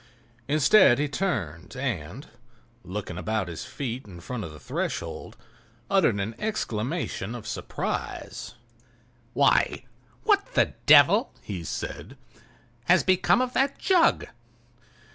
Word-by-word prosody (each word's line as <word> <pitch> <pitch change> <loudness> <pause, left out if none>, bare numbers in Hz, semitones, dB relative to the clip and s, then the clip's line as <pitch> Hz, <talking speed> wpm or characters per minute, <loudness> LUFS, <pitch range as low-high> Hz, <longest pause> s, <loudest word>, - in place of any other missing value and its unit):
Instead 155 - +5
he 145 +1 0
turned 135 - -3
and, 125 - -4 0.6
looking 90 -2 -5
about 110 0 -1
his 85 -2 -6
feet 130 -3 -5
in 90 -3 -11
front 125 +4 -5
of 80 - -7
the 75 - -12
threshold, - - -4 0.5
uttered 165 - +3
an 100 +3 -2
exclamation 125 - -3
of 120 - -8
surprise. - - -5 0.8
"Why!—what - - 0
the - - +3
devil," - - +7
he 90 -4 -5
said, - - -6 0.7
"has 180 +2 +4
become 185 +6 +3
of 255 0 -2
that 275 +1 +1
jug?" 360 -3 +3
120 Hz, 110 wpm, -26 LUFS, -, 0.8 s, devil